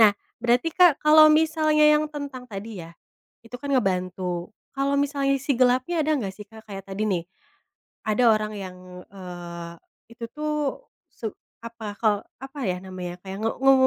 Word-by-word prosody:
nah 215 -2 +9 0.3
berarti 240 +5 +3
Kak, 350 -6 +5
kalau 310 +1 +8
misalnya 310 -1 +3
yang 300 0 +2
tentang 285 -4 -7
tadi 210 -1 -7
ya, 165 +1 -12 0.5
itu 230 - -14
kan 285 -1 -4
ngebantu 185 -4 -1 0.2
kalau 275 +1 0
misalnya 280 -1 +1
sisi 275 -1 -1
gelapnya 255 +7 +3
ada 310 +1 +2
nggak 200 -6 -3
sih 210 +1 -11
Kak, 220 +1 -14
kayak 195 0 -7
tadi 195 +2 -4
nih, 175 -4 0 0.9
ada 240 +4 +3
orang 215 0 0
yang, 185 -2 -7 0.3
eee, 175 -3 -8 0.4
itu 235 0 -8
tuh 305 0 -2 0.6
su 230 - -7 0.4
apa 225 -3 -7
kalo 215 -3 +3 0.3
apa 270 +2 -9
ya 180 - -2
namanya 180 -2 -6
kayak 195 0 -7
nge 225 - +1
nge 270 - +8
230 Hz, 165 wpm, -25 LUFS, 195-280 Hz, 0.9 s, nah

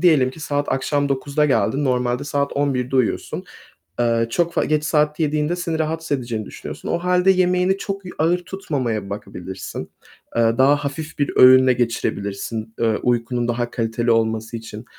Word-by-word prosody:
diyelim 150 -8 +4
ki 145 - -13
saat 145 -1 -2
akşam 140 +2 0
21.00'de 140 +2 0
geldin, 140 0 +1
normalde 125 -1 0
saat 140 -1 -1
23.00'de 135 -2 0
uyuyorsun, 125 -4 -1 0.6
eee, 115 -1 +2
çok 170 +7 0
f - - +2
geç 155 -1 +1
saatte 150 0 +1
yediğinde 150 +2 0
seni 170 -2 -3
rahatsız 160 -2 -1
edeceğini 115 -4 -4
düşünüyorsun. - - -8
O - - +1
hâlde 180 +1 +3
yemeğini 180 +1 +2
çok 195 -1 -5
y 180 - -7
ağır 165 +3 +2
tutmamaya 130 - -3
bakabilirsin. 95 -2 -7 0.5
Eee, 115 0 +3
daha 140 +2 +6
hafif 145 +2 -5
bir 145 - +1
öğünle 130 0 +8
geçirebilirsin, 110 -2 -2
eee, 115 -2 +2
uykunun 120 0 0
daha 120 0 -1
kaliteli 115 0 0
olması 110 0 0
için. 110 0 -9
135 Hz, 160 wpm, -21 LUFS, 115-155 Hz, 0.6 s, öğünle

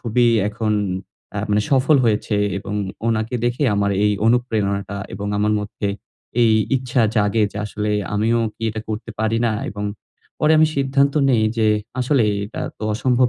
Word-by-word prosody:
খুবই 120 +1 +2 0.2
এখন 110 +1 -1 0.6
আ - - -1
মানে 105 0 +3
সফল 135 +2 +4
হয়েছে 105 -1 +1 0.2
এবং 100 +2 -6 0.3
উনাকে 110 +2 -1
দেখে 120 +4 0
আমার 100 0 +1
এই 105 - +3
অনুপ্রেরণাটা 105 -5 0 0.2
এবং 100 +2 -5
আমার 105 +1 +2
মধ্যে 105 0 -4 0.5
এই 115 - +5 0.3
ইচ্ছা 125 -2 0
জাগে 105 +1 +2
যে - - -9
আসলে 105 0 -3 0.2
আমিও 110 +3 +2 0.2
কি - - -14
এটা 110 0 -5
করতে 110 +2 -4
পারি 110 +1 +1
না? 110 - +1 0.2
এবং 105 0 -5 0.6
পরে 155 +1 +4
আমি 155 - +6
সিদ্ধান্ত 140 0 +2 0.2
নেই 115 -3 +3 0.2
যে 110 - +3 0.3
আসলে 130 0 +2 0.2
এটা 105 - -7 0.2
তো - - -10
অসম্ভব 125 +2 +2
110 Hz, 165 wpm, -21 LUFS, 105-125 Hz, 0.6 s, আমি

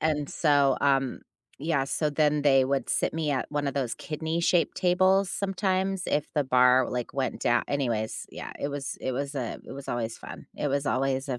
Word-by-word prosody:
and 150 -2 0
so, 145 -4 +3
um, 135 -2 +1 0.4
yeah, 150 -2 0
so 150 +2 -1
then 150 0 +2
they 135 -2 +5
would 135 -2 -1
sit - - 0
me 160 -2 -1
at 130 -3 -2
one 145 -1 -1
of 140 - -2
those 130 -4 -1
kidney-shaped 165 +2 0
tables 185 +1 +3
sometimes 190 -1 -1
if 150 0 0
the 145 - +2
bar, 125 0 +4
like, 125 -1 -4
went 135 -1 -2
dow 120 0 +2
anyways, 120 -6 -2
yeah, - - -7
it 140 - -2
was 140 -1 -4
it 130 - -2
was, 140 +2 -3
uh, 125 -4 -3
it - - -9
was 135 0 -9
always 115 -2 -2
fun - - -10
it 145 - -1
was 140 +1 -1
always 135 +1 0
a 125 -2 -2
140 Hz, 200 wpm, -27 LUFS, 130-155 Hz, 0.4 s, they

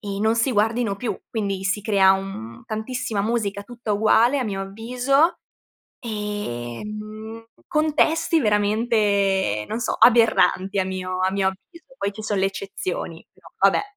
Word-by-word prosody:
e 200 -1 -5
non 220 +1 +3
si 230 +4 +2
guardino 220 0 +1
più, 240 +2 -3
quindi 200 -4 -2
si 190 +2 0
crea, 195 -3 +5
un 190 - -5
tantissima 220 0 -3
musica 210 -3 -1
tutta 235 -2 -5
uguale 220 +6 +4
a 255 - -1
mio 195 -2 -3
avviso 250 - +1 0.6
e, 205 - -4
mhmm, 215 +1 -8 0.2
contesti 320 +1 +2
veramente, 205 - +1
non 225 - -3
so, - - -1
aberranti 220 -5 +4
a 185 - +1
mio 185 -1 -4
a 190 0 +2
mio 195 -1 +1
avviso. 320 - -14
Poi 200 0 -1
ci 215 +1 -8
son 205 -2 -1
le 190 - +3
eccezioni, 195 -4 -5
però - - -19
vabbè. - - +4
210 Hz, 150 wpm, -23 LUFS, 195-230 Hz, 0.6 s, crea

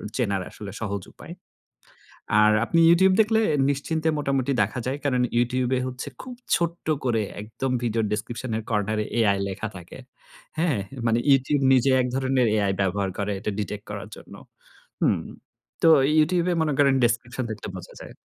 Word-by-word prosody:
চেনার 100 -6 0
আসলে 100 -2 -9
সহজ 100 -2 -3
উপায়। 170 - -11 1.1
আর 105 0 +5
আপনি 165 - +1
YouTube 190 +2 +5
দেখলে 220 +1 +2 0.3
নিশ্চিন্তে 160 +3 -1
মোটামুটি 140 -2 0
দেখা 105 +5 -1
যায়। 130 +2 -2
কারণ 125 -3 +2 0.2
YouTube 125 +1 0
এ - - 0
হচ্ছে 130 0 -6
খুব 255 - -8 0.2
ছোট্ট 170 0 -2 0.2
করে, 115 -3 +1 0.2
একদম 115 +5 -4
ভিডিওর 115 -1 0
ডেসক্রিপশন 115 +3 -4
এর 110 - -5
কর্নার 105 0 0 0.2
AI 100 -3 +3
লেখা 100 +3 -4
থাকে। 90 -1 -11 0.6
হ্যাঁ, 160 -10 +1 0.3
মানে 115 +1 +2
YouTube 135 +1 +2
নিজে 130 +1 +3
এক 125 - -1
ধরনের 130 -2 +1
AI 100 -2 +1
ব্যবহার 95 0 0
করে। 105 0 -1
এটা 105 +1 -3
ডিটেক্ট 105 0 -4
করার - - -7
জন্য। - - -14 0.7
হুম, - - +2 0.6
তো 165 - +6 0.3
YouTube 170 +3 +2
এ - - +1
মনে 155 - 0
করেন 140 -2 +4
ডেসক্রিপশন 120 +2 -1
দেখলে 110 -2 -6
বোঝা 90 - -10
যায়। - - -12
125 Hz, 165 wpm, -24 LUFS, 105-140 Hz, 1.1 s, তো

